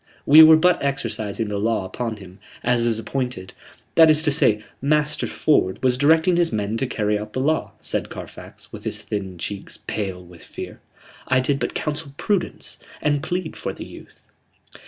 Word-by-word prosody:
We 150 +3 +9
were 160 0 +9
but 180 +3 +3
exercising 115 -6 -2
the 100 -1 -2
law 110 -2 0
upon 115 +2 -4
him, 95 -1 -13 0.2
as 120 -1 +2
is 115 -2 +1
appointed.... 125 -3 -4 0.4
That 160 -1 +7
is 155 0 +5
to 150 - +3
say, 110 -7 +3 0.2
Master 150 +2 +1
Ford 95 -11 +1
was 125 -1 +3
directing 160 +6 +3
his 170 -1 +2
men 105 0 -2
to 135 - -1
carry 105 -3 0
out 105 0 -8
the - - -2
law," 155 +4 0
said - - -2
Carfax, - - -11
with - - -9
his - - -2
thin 95 -3 -5
cheeks 100 +4 -6
pale 95 -4 -4
with 85 -2 -15
fear. - - -9 0.5
"I 130 - +3
did 135 +2 0
but - - -3
counsel 150 -2 -3
prudence, 200 -4 -2 0.2
and 145 -1 +1
plead 175 +1 -3
for - - -4
the - - -8
youth." - - -14
125 Hz, 180 wpm, -22 LUFS, 105-150 Hz, 0.5 s, We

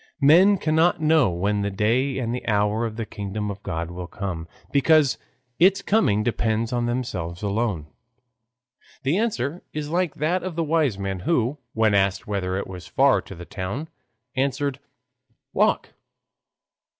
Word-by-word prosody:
Men 175 +8 +6
cannot 160 +1 +2
know 155 -6 +4
when 100 +4 0
the 100 - 0
day 115 +7 +1
and 120 -3 -2
the 125 - -5
hour 105 +2 +1
of 110 - -8
the 115 0 -3
kingdom 105 0 -4
of 100 0 -9
God 85 -2 -4
will 90 0 -6
come, 90 -4 -5 0.2
because 145 0 +4 0.4
its 190 +3 +4
coming 155 - +2
depends 110 0 0
on 120 -1 0
themselves 95 -8 -3
alone. 100 -6 -1 1.2
The 140 +7 +1
answer 175 - -1
is 150 0 -4
like 175 -2 0
that 170 +5 0
of 185 -3 -5
the 165 - 0
wise 155 -8 +1
man 95 -1 -3
who, 125 - 0
when 110 -2 +2
asked 100 -1 +2
whether 95 -2 -2
it 100 - -3
was 90 -2 -9
far 135 0 +3
to 95 - -11
the 85 +1 -9
town, 100 - -5 0.5
answered, 140 +1 -1 0.7
"Walk!" - - +2
115 Hz, 155 wpm, -24 LUFS, 100-150 Hz, 1.2 s, Men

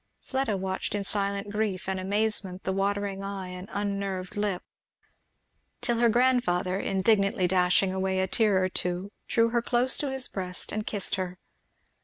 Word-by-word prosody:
Fleda 265 -6 -1
watched 190 +1 -2
in 205 - -1
silent 200 0 -1
grief 205 -4 -1
and 190 0 -1
amazement 200 -1 0
the 190 - -1
watering 200 0 -1
eye 195 -2 -5
and 180 +3 -8
unnerved 200 -2 -3
lip; 205 -3 -1 1.2
till 240 -2 0
her 235 -1 +5
grandfather 215 -7 +2
indignantly 195 -2 +2
dashing 185 +1 +3
away 190 0 0
a 190 - +2
tear 195 -1 +2
or - - +3
two 180 +2 -1 0.2
drew 230 0 +3
her 235 0 +1
close 245 +2 +3
to 290 - -1
his 265 -1 0
breast 180 -2 -3
and 215 0 -3
kissed 205 -3 -2
her. 185 -1 -3
195 Hz, 160 wpm, -28 LUFS, 185-215 Hz, 1.2 s, her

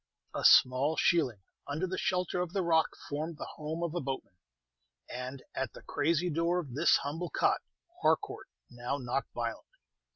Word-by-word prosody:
A - - -3
small 130 +5 +6
shealing 130 - +2 0.2
under 150 +6 -1
the 185 0 -3
shelter 180 -1 0
of 180 -1 -3
the 195 -2 +1
rock 160 -2 +2
formed 155 +2 -3
the - - -5
home 160 +2 -5
of 170 -2 -2
a 175 - -1
boatman; 135 -7 -4 0.7
and 130 +2 -6
at 135 -4 -3
the - - -12
crazy 165 +4 +1
door 170 +3 +1
of 150 -8 -4
this 140 - +5
humble 160 +5 -3
cot - - +2 0.4
Harcourt - - +1 0.2
now 120 +3 -3
knocked 130 0 -2
violently. - - -4
155 Hz, 165 wpm, -31 LUFS, 135-170 Hz, 0.7 s, small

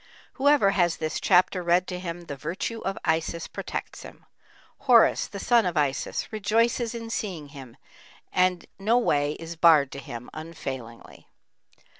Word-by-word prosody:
Whoever 280 -7 +4
has 175 -4 +1
this 155 0 -3
chapter 185 0 +3
read 175 +1 +2
to 180 -1 -4
him, 175 -1 -6
the 155 -4 -7
virtue 175 - -4
of 195 -2 -3
Isis 160 +1 -1
protects - - -6
him; - - -13 0.6
Horus, 235 -3 +5
the 200 - -8
son 235 +3 +3
of 180 -4 -2
Isis, 145 +7 -1
rejoices 230 +3 +1
in 230 -1 -6
seeing 175 -11 -4
him, 135 -5 -12 0.6
and 180 -1 +2
no 220 +5 +2
way 145 -11 +1
is 165 +1 -8
barred 160 -5 +5
to 140 - -7
him, 120 -2 -9
unfailingly. 135 -7 -8
175 Hz, 150 wpm, -26 LUFS, 155-210 Hz, 0.6 s, Horus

